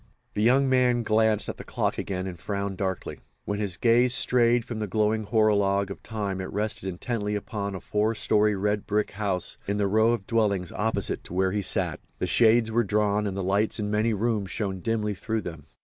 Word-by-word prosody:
The 105 - -1
young 130 +5 +4
man 125 -2 +3
glanced 110 -1 +2
at - - -5
the - - -8
clock - - -2
again 95 -1 -3
and 90 -3 -6
frowned 100 0 -3
darkly. 95 -1 -3 0.3
When 100 0 -2
his 100 -5 -2
gaze 120 +2 +4
strayed 120 -1 +3
from 115 -3 -5
the 105 - -2
glowing 110 +2 +1
horologue 100 -3 +2
of - - -8
time 100 -4 -3
it 95 - -6
rested 105 -2 -2
intently 105 +3 -3
upon 100 -1 -4
a - - -5
four 105 +4 0
story 105 0 +2
red 105 +1 -1
brick 105 +1 0
house 100 -3 -2
in 100 +1 0
the 105 - +1
row 110 +3 +3
of 100 -5 -3
dwellings 100 -6 0
opposite 105 -2 -2
to 90 - -8
where 95 0 +2
he 105 +1 -1
sat. - - -1 0.2
The - - -1
shades 115 +5 +4
were 120 +1 +2
drawn, 105 0 +1
and 95 -1 -4
the 95 - -2
lights 100 +4 +1
in 105 -1 -2
many 110 +1 +1
rooms 105 -2 -1
shone 95 0 -3
dimly 105 0 -1
through 110 +3 -3
them. 80 -6 -8
105 Hz, 210 wpm, -26 LUFS, 100-110 Hz, 0.3 s, young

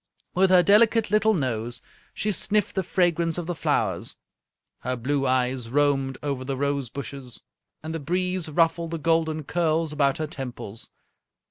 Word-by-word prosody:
With 190 +1 +4
her 180 -1 +6
delicate 215 +2 +4
little 215 +1 +4
nose 120 -5 -2 0.3
she 210 - -1
sniffed 205 +2 +1
the 190 - 0
fragrance 170 -2 +1
of 175 - -3
the 175 - -2
flowers. 115 - -1 0.6
Her 125 +1 -2
blue 135 +3 0
eyes 125 -2 +1
roamed 135 -1 +1
over 140 -3 -2
the 135 0 -3
rose 140 -2 -1
bushes, 135 -1 -7 0.4
and 160 +1 -5
the 165 - -3
breeze 180 +2 -1
ruffled 165 +1 +2
the 165 - -3
golden 160 -1 +1
curls 160 0 0
about 140 -2 +2
her 155 - -2
temples. 125 -7 -5
155 Hz, 155 wpm, -25 LUFS, 135-175 Hz, 0.6 s, her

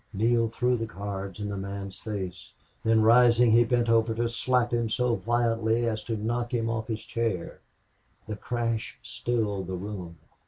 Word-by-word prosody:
Neale 115 +3 +2
threw 125 +2 +1
the 115 0 -3
cards 100 0 -6
in 105 - -3
the 100 - -3
man's 100 0 -6
face; 95 -5 -6 0.3
then, 110 -1 +4
rising, 120 0 +6
he 115 +2 +6
bent 120 0 +1
over 115 0 +3
to 120 +1 0
slap 120 +1 0
him 115 -1 +1
so 125 +1 +1
violently 115 0 +1
as 110 -1 -2
to 115 -2 -2
knock 120 +3 -2
him 115 -1 0
off 110 -1 -3
his 110 -1 -4
chair. 115 -7 -2 0.7
The 105 - -3
crash 115 +1 -3
stilled 105 -6 -2
the 95 - -3
room. 90 -3 -6
115 Hz, 170 wpm, -27 LUFS, 105-120 Hz, 0.7 s, rising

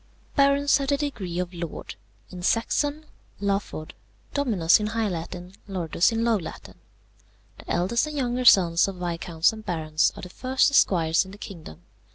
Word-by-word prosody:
"Barons 280 0 +4
have 275 - -3
the 285 - +2
degree 210 - -4
of 180 0 -3
lord: 170 -2 -6 0.4
in 180 -1 -8
Saxon, 290 - 0 0.3
laford; 195 -6 -3 0.4
dominus 215 - +3
in 210 - -2
high 225 0 -1
Latin; 180 +1 -6
Lordus 180 0 +1
in 225 0 -1
low 230 -2 +3
Latin. 175 - -9 0.8
The - - -13
eldest 195 - +1
and 300 -1 -6
younger 250 -1 -1
sons 175 -6 +6
of 195 - -5
viscounts 170 0 0
and 220 0 -9
barons 160 -4 0
are - - -10
the 180 - -7
first 260 +7 +1
esquires 165 -10 +3
in 190 - -13
the 200 - -11
kingdom. 170 - -10
195 Hz, 165 wpm, -25 LUFS, 175-245 Hz, 0.8 s, sons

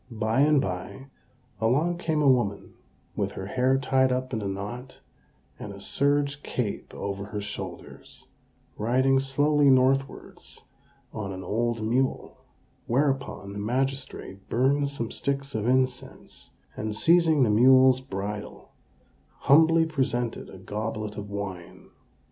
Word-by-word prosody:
By 110 0 -1
and 150 0 +5
by, 95 +7 -5 0.5
along 150 +10 +1
came 160 -3 0
a - - +4
woman 120 -6 +1 0.4
with - - -2
her 95 - -6
hair 130 +5 +1
tied 130 -1 +2
up 130 0 -2
in 110 - -1
a 100 - -3
knot, 105 +7 -6 0.6
and 105 - -7
a 100 - -10
serge 140 +6 0
cape 110 -5 -4
over 100 0 -4
her 105 0 -5
shoulders, 95 -3 -7 0.5
riding 130 +5 +3
slowly 145 +2 +3
northwards 135 +1 0 0.5
on 100 -2 -4
an 95 0 -7
old 115 +2 -1
mule; 125 +4 -1 0.5
whereupon 135 -7 -1
the 100 - -6
magistrate 130 -4 -3
burned 140 +4 +2
some 115 -5 -5
sticks 140 0 -3
of 110 +1 -2
incense, 130 0 -2 0.3
and, 110 -1 -4
seizing 160 +1 +4
the 110 - +3
mule's 130 +3 +6
bridle, 105 -4 -6 0.7
humbly 160 +3 +5
presented 125 -6 -2
a 95 - -11
goblet 105 +2 -5
of 105 -1 -7
wine. 95 -4 -7
125 Hz, 130 wpm, -26 LUFS, 105-135 Hz, 0.7 s, mule's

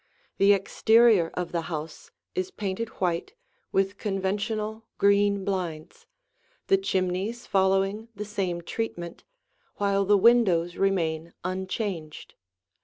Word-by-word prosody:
The 200 +1 +6
exterior 215 -1 +4
of 180 -1 -3
the 170 - -1
house 155 -1 -6 0.2
is 185 0 -2
painted 205 +2 -4
white 180 - -1 0.4
with 195 +1 0
conventional 210 +2 -2
green 200 -1 +3
blinds, 175 -6 -4 0.6
the 390 - +4
chimneys 195 - -1
following 195 +3 +1
the 210 - -5
same 190 -4 -2
treatment, 175 -3 -5 0.5
while 200 -1 +1
the 205 +1 +4
windows 190 -6 +4
remain 170 -4 0
unchanged. 185 -3 -4
195 Hz, 110 wpm, -26 LUFS, 175-210 Hz, 0.6 s, The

